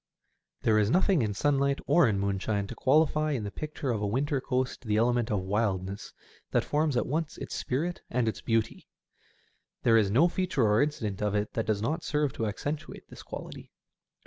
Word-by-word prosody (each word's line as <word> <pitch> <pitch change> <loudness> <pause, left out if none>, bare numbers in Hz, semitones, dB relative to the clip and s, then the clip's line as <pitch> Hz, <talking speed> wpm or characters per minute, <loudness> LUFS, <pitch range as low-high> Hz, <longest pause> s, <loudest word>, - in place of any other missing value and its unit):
There 110 -1 +4
is 105 -1 +2
nothing 185 - +3
in 105 -3 -1
sunlight 140 +2 +2
or 175 -7 +5
in 105 -3 +1
moonshine 100 +1 -1
to - - -7
qualify 155 +2 +2
in 120 -6 -2
the 100 - -4
picture 150 -1 -4
of 110 -3 -2
a 105 - 0
winter 135 +5 0
coast 130 0 -2
the 105 -3 0
element 120 0 +2
of 105 -3 0
wildness 100 -1 -2 0.4
that - - +1
forms 150 -3 0
at - - +1
once 155 +3 -2
its - - -6
spirit 165 +8 -2
and 125 -1 0
its 110 - -2
beauty. 115 -1 -1 1.0
There 115 -1 +5
is 100 -3 +2
no 135 - +5
feature 180 -6 0
or 105 +1 +4
incident 110 -10 -2
of 105 -1 0
it 105 +1 -1
that 115 - -2
does 105 -1 0
not 160 +7 -1
serve 150 -3 0
to 115 - -2
accentuate 145 +8 -5
this - - -11
quality. - - -9
120 Hz, 195 wpm, -29 LUFS, 105-145 Hz, 1.0 s, or